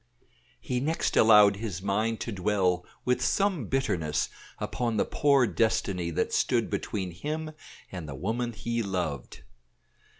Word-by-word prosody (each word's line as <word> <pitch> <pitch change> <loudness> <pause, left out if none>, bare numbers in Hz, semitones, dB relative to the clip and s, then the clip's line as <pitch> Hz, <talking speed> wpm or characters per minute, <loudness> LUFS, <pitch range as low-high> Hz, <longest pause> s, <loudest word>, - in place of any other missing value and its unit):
He 125 - -2
next 155 +5 -1
allowed 105 -2 +7
his 100 -4 -5
mind 110 +3 0
to 115 - -3
dwell 95 -3 0 0.2
with 125 0 +1
some 195 - +1
bitterness 80 - 0 0.3
upon 120 -3 -2
the - - +2
poor 140 -3 +3
destiny 95 -3 0
that 80 - -1
stood - - +1
between 95 -4 -3
him 155 - -4 0.4
and 85 -5 -6
the 70 - -6
woman 115 - -2
he 115 +1 -2
loved. 90 - -4
105 Hz, 135 wpm, -28 LUFS, 90-125 Hz, 0.4 s, allowed